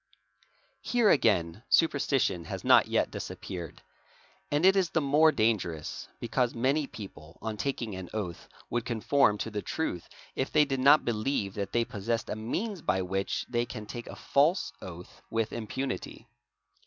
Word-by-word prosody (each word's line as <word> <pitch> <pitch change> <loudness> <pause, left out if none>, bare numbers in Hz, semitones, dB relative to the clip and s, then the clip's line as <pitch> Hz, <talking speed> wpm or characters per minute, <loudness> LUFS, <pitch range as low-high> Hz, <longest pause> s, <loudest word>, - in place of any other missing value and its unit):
Here 235 -4 +3
again 95 - +2
superstition 135 - +2
has - - -6
not - - +6
yet - - +1
disappeared, 85 -4 -7 0.7
and 145 +4 +2
it 190 +1 +7
is 190 -3 +2
the - - +1
more 150 +2 +5
dangerous 105 - -1
because 120 +1 0
many 135 +5 +1
people 85 -9 -11
on 110 -1 -4
taking 120 -2 -3
an 95 -1 -7
oath 95 -6 -5 0.2
would 120 0 0
conform 120 -1 +2
to 110 - -4
the 105 -1 -3
truth 130 - -3 0.3
if 130 - -2
they 150 -1 +5
did 135 -2 -2
not 140 +4 +6
believe 110 -3 -1
that 100 -1 -4
they 120 0 +2
possessed 115 +2 -3
a - - -1
means 175 - -3
by 95 -6 +1
which 95 +2 -2
they 120 0 -1
ean 110 -2 -6
take 120 +2 -7
a - - -8
false 140 - +2
oath 90 -1 -10
with 115 -1 -1
impunity. 120 +1 -4
115 Hz, 160 wpm, -29 LUFS, 100-140 Hz, 0.7 s, it